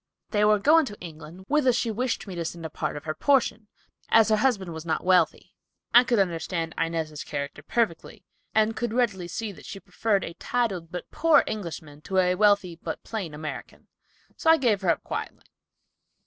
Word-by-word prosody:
They 210 Hz, -2 st, +2 dB
were 210 Hz, 0 st, +5 dB
going 305 Hz, +7 st, +4 dB
to 205 Hz, -, -9 dB
England, 165 Hz, +2 st, -10 dB
whither 290 Hz, -3 st, +3 dB
she 235 Hz, -1 st, 0 dB
wished 245 Hz, +3 st, -2 dB
me 195 Hz, -, -7 dB
to 170 Hz, -1 st, -3 dB
send 165 Hz, 0 st, -6 dB
a 160 Hz, -, -5 dB
part -, -, -3 dB
of 145 Hz, -, -8 dB
her 155 Hz, -, -3 dB
portion, 240 Hz, -, +1 dB, 0.4 s
as 225 Hz, -1 st, +5 dB
her 215 Hz, -, +4 dB
husband 210 Hz, -8 st, 0 dB
was 160 Hz, -1 st, -7 dB
not 160 Hz, -2 st, -2 dB
wealthy. 185 Hz, 0 st, +2 dB, 0.4 s
I 245 Hz, -, +9 dB
could 245 Hz, -2 st, +1 dB
understand 170 Hz, -3 st, -1 dB
Inez's 160 Hz, -3 st, -2 dB
character 140 Hz, 0 st, -5 dB
perfectly, 205 Hz, +2 st, -2 dB, 0.3 s
and 220 Hz, 0 st, +3 dB
could 240 Hz, -1 st, -2 dB
readily 205 Hz, -8 st, 0 dB
see 215 Hz, +4 st, -4 dB
that 195 Hz, -, -13 dB
she 195 Hz, -, -7 dB
preferred 195 Hz, +2 st, -1 dB
a 170 Hz, -, -6 dB
titled 190 Hz, -7 st, -2 dB
but 180 Hz, -, -7 dB
poor 330 Hz, 0 st, +4 dB
Englishman 160 Hz, -8 st, -6 dB
to 190 Hz, +4 st, -3 dB
a 180 Hz, -1 st, +4 dB
wealthy, 200 Hz, -3 st, +2 dB
but 160 Hz, -, -5 dB
plain 190 Hz, -9 st, -5 dB
American, 150 Hz, -2 st, -8 dB, 0.5 s
so 320 Hz, -, 0 dB
I 325 Hz, -, +7 dB
gave 225 Hz, -8 st, +1 dB
her 185 Hz, -, 0 dB
up 165 Hz, -, +1 dB
quietly." -, -, -6 dB
195 Hz, 190 wpm, -26 LUFS, 165-225 Hz, 0.5 s, I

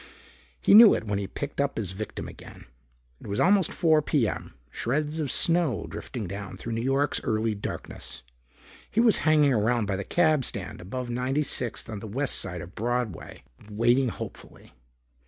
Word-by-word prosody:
He -, -, +3 dB
knew 220 Hz, 0 st, +10 dB
it -, -, -3 dB
when 105 Hz, -2 st, -2 dB
he 100 Hz, -, -3 dB
picked 145 Hz, +7 st, -4 dB
up 140 Hz, 0 st, -1 dB
his 100 Hz, -5 st, -2 dB
victim 105 Hz, +3 st, -6 dB
again. -, -, -12 dB, 0.5 s
It -, -, -11 dB
was 100 Hz, 0 st, -2 dB
almost 190 Hz, -1 st, +4 dB
4 160 Hz, -2 st, +3 dB
P.M., 130 Hz, -, -1 dB, 0.2 s
shreds 150 Hz, +5 st, -2 dB
of 145 Hz, -5 st, -1 dB
snow 165 Hz, -, +2 dB
drifting 115 Hz, -4 st, -6 dB
down 100 Hz, +1 st, -7 dB
through 115 Hz, -, -6 dB
New 115 Hz, -, -2 dB
York's 135 Hz, +3 st, +1 dB
early 110 Hz, 0 st, 0 dB
darkness. 65 Hz, -9 st, -7 dB, 0.7 s
He 220 Hz, -, -1 dB
was 230 Hz, -3 st, +5 dB
hanging 150 Hz, -3 st, +5 dB
around 115 Hz, 0 st, +1 dB
by 100 Hz, -1 st, -2 dB
the 100 Hz, -, -3 dB
cab 155 Hz, -, +2 dB
stand -, -, -5 dB
above 120 Hz, +7 st, -5 dB
96th 125 Hz, 0 st, -1 dB
on 110 Hz, -3 st, -6 dB
the 110 Hz, -, -8 dB
west 135 Hz, +6 st, 0 dB
side 90 Hz, -3 st, -4 dB
of 90 Hz, +4 st, -10 dB
Broadway, 120 Hz, -5 st, -3 dB, 0.3 s
waiting 120 Hz, +5 st, +2 dB
hopefully. -, -, -9 dB
120 Hz, 170 wpm, -27 LUFS, 105-150 Hz, 0.7 s, knew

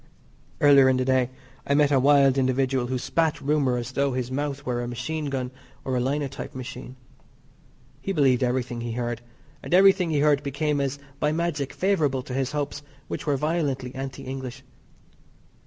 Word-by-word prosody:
Earlier 140 Hz, -2 st, +7 dB
in 130 Hz, -, +3 dB
the 130 Hz, -, 0 dB
day 130 Hz, -1 st, +2 dB, 0.4 s
I 140 Hz, -, +2 dB
met 145 Hz, 0 st, +4 dB
a 135 Hz, -, +4 dB
wild 140 Hz, 0 st, +5 dB
individual 130 Hz, -1 st, +1 dB
who 130 Hz, +1 st, -1 dB
spat 160 Hz, +4 st, 0 dB
rumour 140 Hz, -3 st, +1 dB
as 120 Hz, +1 st, -4 dB
though 140 Hz, 0 st, 0 dB
his 125 Hz, 0 st, -3 dB
mouth 140 Hz, 0 st, -3 dB
were 120 Hz, -1 st, -1 dB
a 120 Hz, -, -4 dB
machine 150 Hz, +6 st, -3 dB
gun 130 Hz, -3 st, -3 dB, 0.3 s
or 130 Hz, -, -1 dB
a -, -, +1 dB
linotype 140 Hz, +2 st, -3 dB
machine. 125 Hz, 0 st, -7 dB, 1.1 s
He 195 Hz, -, -3 dB
believed 135 Hz, -8 st, +3 dB
everything 125 Hz, -1 st, -1 dB
he 120 Hz, -1 st, -4 dB
heard; 120 Hz, -1 st, -3 dB, 0.4 s
and 175 Hz, -, 0 dB
everything 190 Hz, -2 st, +5 dB
he 150 Hz, -3 st, +1 dB
heard 145 Hz, -1 st, +4 dB
became 145 Hz, +1 st, -1 dB
as 140 Hz, 0 st, -2 dB, 0.2 s
by 150 Hz, -, +1 dB
magic 155 Hz, -4 st, -1 dB
favourable 150 Hz, -9 st, +1 dB
to 130 Hz, -, -7 dB
his 135 Hz, 0 st, -1 dB
hopes, 145 Hz, -1 st, -3 dB, 0.3 s
which -, -, -5 dB
were 145 Hz, -2 st, +2 dB
violently 145 Hz, -4 st, -1 dB
anti 135 Hz, 0 st, -6 dB
English. 130 Hz, 0 st, -6 dB
135 Hz, 175 wpm, -25 LUFS, 130-145 Hz, 1.1 s, Earlier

